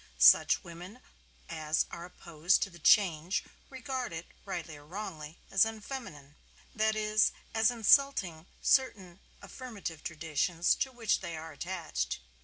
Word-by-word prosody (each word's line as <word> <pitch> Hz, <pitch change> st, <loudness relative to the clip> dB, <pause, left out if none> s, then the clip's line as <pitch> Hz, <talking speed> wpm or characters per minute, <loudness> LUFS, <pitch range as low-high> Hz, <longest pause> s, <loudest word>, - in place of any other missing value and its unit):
Such -, -, +6 dB
women 180 Hz, +6 st, -10 dB, 0.5 s
as 155 Hz, -1 st, 0 dB
are 170 Hz, -, -7 dB
opposed 170 Hz, 0 st, 0 dB
to 195 Hz, -, -5 dB
the 170 Hz, -, -14 dB
change 175 Hz, +1 st, +3 dB, 0.3 s
regard 260 Hz, -3 st, -4 dB
it 165 Hz, +1 st, -6 dB, 0.2 s
(rightly 170 Hz, -5 st, -5 dB
or 145 Hz, -, -14 dB
wrongly) 160 Hz, -3 st, -7 dB
as 195 Hz, -1 st, +5 dB
unfeminine. 215 Hz, -, -6 dB, 0.4 s
That 220 Hz, 0 st, +1 dB
is, 215 Hz, 0 st, +2 dB, 0.2 s
as 225 Hz, 0 st, +4 dB
insulting 220 Hz, -, +3 dB, 0.2 s
certain 195 Hz, -9 st, +1 dB, 0.2 s
affirmative 205 Hz, -, -7 dB
traditions 165 Hz, +1 st, 0 dB
to 265 Hz, -, -1 dB
which 230 Hz, -4 st, 0 dB
they 170 Hz, -3 st, -6 dB
are 160 Hz, +1 st, -8 dB
attached. 155 Hz, -, -4 dB
180 Hz, 130 wpm, -31 LUFS, 160-220 Hz, 0.5 s, Such